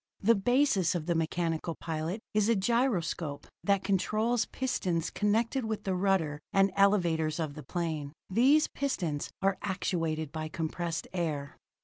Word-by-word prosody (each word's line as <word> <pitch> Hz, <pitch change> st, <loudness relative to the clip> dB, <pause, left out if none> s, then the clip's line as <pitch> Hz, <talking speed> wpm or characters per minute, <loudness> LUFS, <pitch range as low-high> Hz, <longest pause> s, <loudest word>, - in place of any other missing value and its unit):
The 230 Hz, +4 st, +5 dB
basis 225 Hz, -, +2 dB
of 165 Hz, -3 st, -2 dB
the 175 Hz, -, +1 dB
mechanical 165 Hz, 0 st, -1 dB
pilot 165 Hz, +5 st, -3 dB
is 215 Hz, 0 st, +3 dB
a 230 Hz, -, +4 dB
gyroscope 190 Hz, -, 0 dB, 0.2 s
that 200 Hz, -1 st, +2 dB
controls 215 Hz, +4 st, +1 dB
pistons 180 Hz, -10 st, -1 dB
connected 225 Hz, +5 st, +1 dB
with 220 Hz, -2 st, -3 dB
the 190 Hz, -, -1 dB
rudder 180 Hz, -6 st, +1 dB
and 195 Hz, 0 st, +4 dB
elevators 170 Hz, -6 st, +3 dB
of 155 Hz, -3 st, -2 dB
the 150 Hz, -, -8 dB
plane. 155 Hz, -1 st, -3 dB, 0.2 s
These 265 Hz, +10 st, +4 dB
pistons 175 Hz, -, -2 dB
are 195 Hz, 0 st, +2 dB
actuated 165 Hz, -6 st, -1 dB
by 155 Hz, -1 st, -4 dB
compressed 165 Hz, +1 st, -3 dB
air. 150 Hz, -6 st, -2 dB
180 Hz, 140 wpm, -30 LUFS, 160-210 Hz, 0.2 s, The